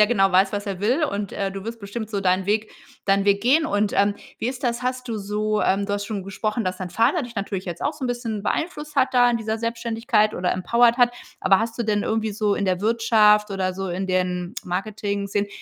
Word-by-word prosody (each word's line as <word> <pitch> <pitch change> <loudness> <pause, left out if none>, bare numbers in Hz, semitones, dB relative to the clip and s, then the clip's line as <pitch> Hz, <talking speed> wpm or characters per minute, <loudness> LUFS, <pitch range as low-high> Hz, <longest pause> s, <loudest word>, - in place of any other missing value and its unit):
der 210 - +7
genau 195 -5 +2
weiß, 190 +1 +4
was 205 0 -2
er 195 -2 -4
will 255 +10 +2
und, 200 -6 -3
äh, 195 -1 -2
du 195 0 -7
wirst 230 0 -6
bestimmt 215 +2 -5
so 200 -2 -1
deinen 185 0 +1
Weg 215 +1 0 0.3
deinen 195 0 +2
Weg 200 0 +2
gehen. 305 +6 +4
Und, 205 -5 0
ähm, 200 0 +3 0.2
wie 235 - -1
ist 260 +1 -5
das? 240 0 -1
Hast 255 0 -3
du 225 - -2
so, 210 +1 -1
ähm 195 +1 +2
du 205 - -2
hast 205 0 -2
schon 205 -3 -4
gesprochen, 215 +3 -2
dass 185 0 -2
dein 185 -2 -5
Vater 230 - +2
dich 240 -1 -8
natürlich 195 -2 -3
jetzt 175 -2 -6
auch 300 - 0
so 290 -3 -6
'n - - 0
bisschen 235 -4 -3
beeinflusst 300 +2 -3
hat 265 -1 +3
da 245 -1 +5
an 235 - +2
dieser 220 0 -2
Selbständigkeit 230 -1 0
oder 180 0 0
empowered 235 +5 +3
hat. 245 -1 +4 0.3
Aber 195 - +4
hast 230 +1 -3
du - - +1
denn 210 -1 0
irgendwie 220 -1 -1
so 210 -1 +1
in 200 - -1
der 185 0 0
Wirtschaft 215 -1 +4
oder 185 -2 -1
so 195 0 -4
in 185 +2 -3
den 180 +1 -1
Marketing-Szenen 200 +1 -2
210 Hz, 240 wpm, -23 LUFS, 195-235 Hz, 0.3 s, der